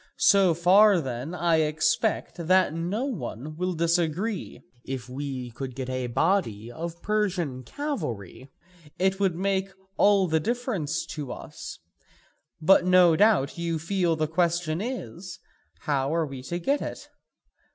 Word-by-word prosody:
So 190 -4 +5
far 190 +3 +6
then 135 +3 -4
I 170 -2 +2
expect 155 +2 0
that 185 -3 +4
no 180 +10 -2
one 155 - -5
will 180 +2 -1
disagree: 170 +5 -1 0.2
if 130 -2 -5
we 130 -2 -5
could 130 +1 -6
get 130 -1 -4
a 130 -1 -2
body 120 - 0
of 170 +4 -7
Persian 185 -11 -1
cavalry 130 - -5 0.5
it 190 +1 +1
would 190 -4 +1
make 195 +1 0 0.3
all 200 -2 +5
the 160 -1 +2
difference 185 - -2
to 145 -5 -6
us; - - -8 0.8
but 175 +3 +5
no 180 -2 +5
doubt 190 -7 +3
you 170 -1 -1
feel 175 +1 0
the 155 0 0
question 170 0 0
is, 180 - -6 0.4
how 140 -3 0
are 165 -1 +1
we 135 -3 -8
to 170 +7 -4
get 280 +12 0
it? - - -6
170 Hz, 140 wpm, -26 LUFS, 140-190 Hz, 0.8 s, far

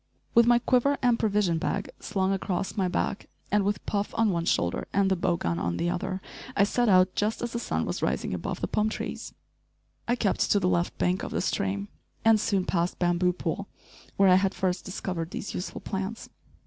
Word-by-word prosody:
With 235 0 +6
my 240 0 +6
quiver 255 +3 +2
and 245 -2 +3
provision 205 -6 +1
bag - - -2
slung 190 0 0
across 190 -1 -2
my 190 -3 +1
back 195 +2 -2 0.2
and 205 -1 +3
with 205 0 -1
Puff 205 -1 -2
on 225 -2 +3
one 170 -2 -1
shoulder 85 - 0
and 195 -1 +2
the - - +4
bow 175 -1 +1
gun 85 - -1
on 85 0 -1
the 175 - 0
other, 190 +1 -3 0.4
I 200 - +6
set 240 +3 +2
out 185 -1 +5
just 215 +3 -1
as 240 - -3
the 235 - -1
sun - - -1
was - - -3
rising - - -1
above - - -4
the - - 0
palm 215 +1 +1
trees. - - -5 0.7
I 240 - +2
kept 210 -5 +1
to 205 - +4
the 180 - +1
left 175 -1 0
bank 180 +1 +1
of - - -4
the - - -2
stream, 200 0 -1 0.4
and 225 -1 +6
soon 200 -3 +1
passed 175 0 0
"Bamboo 175 0 +2
Pool" - - -3 0.5
where 195 -1 +6
I 180 - +7
had 195 0 0
first 185 -1 -1
discovered 180 -3 -4
these 195 - -5
useful 180 - -5
plants. 195 +3 -4
195 Hz, 210 wpm, -27 LUFS, 180-210 Hz, 0.7 s, I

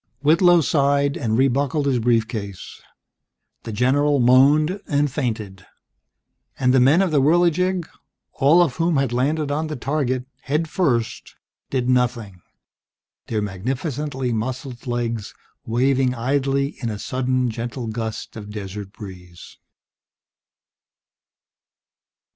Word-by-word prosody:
Whitlow 170 +3 +5
sighed 140 -1 +2
and 110 -2 -1
re 135 +2 +4
buckled 140 +3 0
his 130 -3 +1
brief 115 -1 +2
case. 100 -5 -7 0.8
The 115 - -5
general 140 +6 +2
moaned 145 +9 +4
and 145 -1 +1
fainted. 110 -8 -4 0.9
And 125 -1 +2
the 130 - +5
men 145 +9 +5
of 185 - -1
the 145 -3 +3
Whirligig, 175 +3 +2 0.5
all 155 +6 +5
of 145 -8 -2
whom 165 -2 +1
had 135 -3 0
landed 145 +4 0
on 155 +2 -1
the 155 - -4
target 130 -1 -1 0.2
head 150 +4 -1
first, 130 -10 -1 0.3
did 125 -2 -1
nothing, 120 -7 0 0.9
their 110 -2 -1
magnificently 130 - -3
muscled 125 +2 -5
legs 115 -3 -3 0.3
waving 130 +2 +1
idly 140 +3 0
in 120 - -2
a 105 - -4
sudden 130 +1 -1
gentle 120 +2 -5
gust 110 0 -5
of 105 -2 -8
desert 100 -1 -7
breeze. 90 -5 -12
130 Hz, 120 wpm, -22 LUFS, 115-145 Hz, 0.9 s, Whitlow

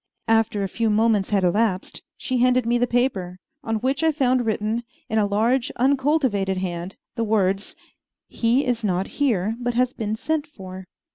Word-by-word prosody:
After 225 -2 +2
a - - 0
few 225 +4 -1
moments 215 -2 +2
had 200 -2 +1
elapsed, 185 +1 0 0.2
she 255 -2 -2
handed 250 0 +3
me 240 +1 +2
the 245 - +2
paper, 220 -8 0 0.3
on 225 -3 -1
which 265 +7 -1
I 320 - +4
found 255 -5 +1
written, 220 +2 0 0.3
in 220 - +1
a 205 - +2
large, 230 +5 +1
uncultivated 260 -7 +1
hand, 180 0 -4 0.2
the 230 - -2
words, 200 -2 0 0.5
"He 240 +5 +1
is 240 -2 -1
not 190 -2 0 0.2
here, 220 -6 +1
but 245 -1 -2
has 250 +1 +2
been 215 -2 -3
sent 310 +5 -2
for." 190 -8 -10
225 Hz, 170 wpm, -23 LUFS, 200-250 Hz, 0.5 s, I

